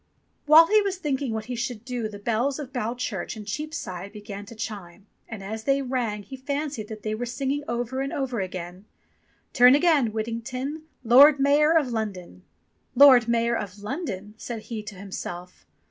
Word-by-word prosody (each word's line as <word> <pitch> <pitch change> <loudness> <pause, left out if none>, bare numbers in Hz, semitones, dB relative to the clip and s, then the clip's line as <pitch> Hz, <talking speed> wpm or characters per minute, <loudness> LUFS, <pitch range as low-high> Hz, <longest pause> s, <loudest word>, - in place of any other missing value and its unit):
While 315 +2 +9
he 425 +4 +4
was 395 -2 -2
thinking 280 -6 -2
what 220 -1 -3
he 250 - -5
should 240 -1 -4
do 245 -4 -3
the 205 - -9
Bells 235 +6 -1
of 280 -3 -8
Bow 240 -2 -2
Church 225 -4 -4
in 210 - -8
Cheapside 205 - -5
began 205 -1 -9
to 230 - -11
chime, 205 -4 -7 0.2
and 220 -4 -7
as 220 +3 -6
they 275 0 +2
rang 240 -5 -2
he 265 - -9
fancied 280 -3 -4
that 215 -1 -9
they 215 - -2
were 240 +3 -3
singing 275 +4 -2
over 245 +2 -2
and 275 - -3
over 260 -4 -2
again: 185 +1 -7 0.7
"Turn 250 +1 +7
again, 295 -5 +3
Whittington, 255 +7 -4 0.2
Lord 275 +5 +7
Mayor 295 +4 +4
of 290 -5 +1
London." 190 - -5 0.5
"Lord 255 -3 +8
Mayor 235 0 +1
of 205 -3 -5
London 210 - -5
!" - - -36
said 230 -2 -6
he 225 -3 -5
to 210 -1 -9
himself. 180 -2 -8
235 Hz, 180 wpm, -25 LUFS, 210-275 Hz, 0.7 s, While